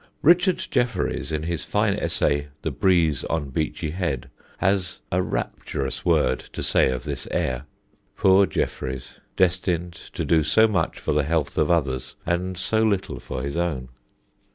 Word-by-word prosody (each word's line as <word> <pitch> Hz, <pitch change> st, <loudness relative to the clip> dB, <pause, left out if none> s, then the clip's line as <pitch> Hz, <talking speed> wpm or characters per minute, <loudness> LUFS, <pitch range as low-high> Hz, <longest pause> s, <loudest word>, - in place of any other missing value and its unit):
Richard 175 Hz, +4 st, +4 dB
Jefferies, 125 Hz, -9 st, 0 dB
in 75 Hz, 0 st, -1 dB
his 85 Hz, -1 st, -2 dB
fine -, -, +1 dB
essay, 70 Hz, 0 st, 0 dB, 0.2 s
"The -, -, -1 dB
Breeze 85 Hz, -7 st, +2 dB
on 75 Hz, -4 st, -2 dB
Beachy 80 Hz, +1 st, -2 dB
Head," 75 Hz, -8 st, -3 dB, 0.3 s
has 95 Hz, -1 st, 0 dB
a 90 Hz, -, +2 dB
rapturous 65 Hz, -6 st, -3 dB
word -, -, +3 dB
to -, -, -4 dB
say -, -, +3 dB
of 65 Hz, -1 st, -2 dB
this -, -, -4 dB
air 65 Hz, +2 st, -1 dB, 0.5 s
(poor 95 Hz, +1 st, +5 dB
Jefferies, 65 Hz, 0 st, -3 dB, 0.2 s
destined 90 Hz, -1 st, +1 dB, 0.2 s
to -, -, -2 dB
do 80 Hz, -1 st, +4 dB
so 110 Hz, +9 st, +4 dB
much 105 Hz, -3 st, 0 dB
for -, -, -1 dB
the 75 Hz, -, +3 dB
health 75 Hz, 0 st, -1 dB
of -, -, +2 dB
others 65 Hz, -6 st, 0 dB
and 90 Hz, +1 st, -1 dB
so 110 Hz, +4 st, +1 dB
little 100 Hz, -4 st, 0 dB
for 65 Hz, -, -5 dB
his 70 Hz, +2 st, -3 dB
own!). 75 Hz, -8 st, -1 dB
85 Hz, 155 wpm, -24 LUFS, 70-95 Hz, 0.5 s, poor